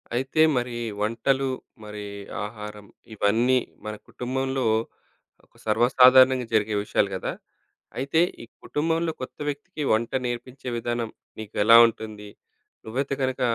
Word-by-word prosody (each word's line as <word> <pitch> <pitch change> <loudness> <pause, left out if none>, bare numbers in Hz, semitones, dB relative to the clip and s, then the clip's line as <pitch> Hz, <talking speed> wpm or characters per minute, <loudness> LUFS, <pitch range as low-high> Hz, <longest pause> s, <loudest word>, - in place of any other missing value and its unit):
అయితే 135 +5 +1 0.2
మరి 120 -1 -2 0.2
వంటలు, 130 +5 +1 0.3
మరి 105 -1 -7 0.4
ఆహారం 105 -1 -8 0.3
ఇవన్నీ 115 +5 +2 0.3
మన 105 0 -4
కుటుంబంలో 130 +1 -2 0.8
ఒక - - -38
సర్వసాధారణంగా 125 +3 +5
జరిగే 110 -1 +2
విషయాలు 105 -1 +1
కదా! 95 - -3 0.7
అయితే 140 +4 +1 0.2
ఈ - - -9 0.2
కుటుంబంలో 165 +2 0
కొత్త 130 - -8
వ్యక్తికి 150 +4 -6
వంట 115 +1 0 0.2
నేర్పించే 125 +2 -6
విధానం 120 -1 -2 0.3
నీకెలా 110 +1 +5
ఉంటుంది? 110 -2 -7 0.6
నువ్వైతే 135 +5 -2
గనక 130 -1 -1
120 Hz, 110 wpm, -25 LUFS, 110-130 Hz, 0.8 s, సర్వసాధారణంగా